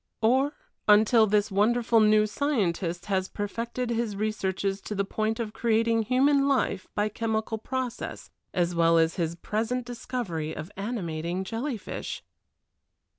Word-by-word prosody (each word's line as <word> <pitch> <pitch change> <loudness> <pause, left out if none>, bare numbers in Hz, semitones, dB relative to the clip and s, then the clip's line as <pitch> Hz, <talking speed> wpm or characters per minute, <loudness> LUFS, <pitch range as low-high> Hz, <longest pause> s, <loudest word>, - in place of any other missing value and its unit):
Or 265 +6 +3 0.3
until 220 +2 +6
this 210 0 +2
wonderful 230 +3 +3
new 215 0 +5
scientist 195 - -1
has 190 -2 0
perfected 235 +4 -3
his 230 -3 -1
researches 195 -2 -1
to 210 - -5
the 200 0 0
point 220 +3 -1
of 220 -2 -3
creating 230 0 +2
human 275 +4 +3
life 245 -8 0
by 205 +1 +2
chemical 220 0 -2
process, 255 0 -4 0.2
as 175 -1 0
well 165 0 +4
as 165 0 +2
his 170 -2 -1
present 230 +7 -2
discovery 225 -10 -4
of 165 +5 -7
animating 185 -5 -3
jellyfish! 230 +4 -4
215 Hz, 130 wpm, -27 LUFS, 190-235 Hz, 0.3 s, until